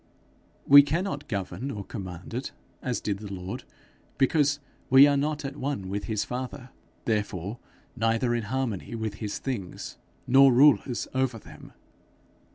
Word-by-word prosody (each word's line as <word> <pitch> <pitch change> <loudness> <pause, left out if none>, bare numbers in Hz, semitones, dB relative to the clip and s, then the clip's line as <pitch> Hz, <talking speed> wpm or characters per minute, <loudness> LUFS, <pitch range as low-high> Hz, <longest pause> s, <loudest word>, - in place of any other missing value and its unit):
We 145 +1 +10
cannot 150 0 -2
govern 110 +5 -4
or 105 -6 -5
command 95 -3 -8
in 120 - -1
it 135 - -7 0.3
as 125 -2 -2
did 100 -2 -2
the 105 -1 -8
Lord, 95 0 -6 0.5
because 145 +1 +2 0.3
we 135 +2 +9
are 145 0 +3
not 150 +1 -1
at 135 0 -5
one 135 -10 -3
with 100 +1 -3
his 110 -3 -1
father, 125 +1 -6 0.3
therefore 105 -1 -2 0.4
neither 115 +1 +1
in 120 -2 -1
harmony 120 -3 -3
with 110 -2 -4
his 105 -2 -3
things, 110 -10 -5 0.3
nor 135 +1 +7
rulers 130 -1 +4
over 130 -2 0
them. - - -14
125 Hz, 150 wpm, -27 LUFS, 105-135 Hz, 0.5 s, We